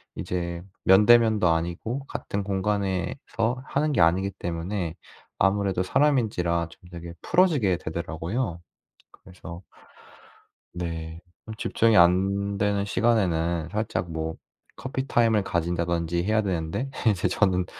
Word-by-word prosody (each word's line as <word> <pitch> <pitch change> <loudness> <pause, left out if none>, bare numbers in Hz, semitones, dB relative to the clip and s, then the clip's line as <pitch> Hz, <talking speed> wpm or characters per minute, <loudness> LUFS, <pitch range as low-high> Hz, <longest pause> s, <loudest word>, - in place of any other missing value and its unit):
이제 85 -1 -4 0.2
면대면도 105 0 +6
아니고 85 +11 -2
같은 100 -6 -4
공간에서 100 +5 -1
하는 150 +4 0
게 - - 0
아니기 90 +4 +3
때문에 85 -1 -4 0.4
아무래도 95 -1 +1
사람인지라 90 - +1
좀 90 - -17
되게 85 -1 -8
풀어지게 150 - +3
되더라고요. 85 +5 -4 0.5
그래서 90 -1 -11 1.1
네. 85 -2 -5 0.2
좀 110 - -7
집중이 115 0 +2
안 95 +3 +3
되는 100 0 +1
시간에는 85 -7 +1
살짝 105 -5 -2
뭐 80 0 -3 0.4
커피타임을 120 -5 +1
가진다든지 85 -1 -1
해야 110 +2 +2
되는데 90 +6 -2 0.2
이제 95 -5 0
저는 90 -3 +1
95 Hz, 275 characters per minute, -25 LUFS, 85-110 Hz, 1.1 s, 면대면도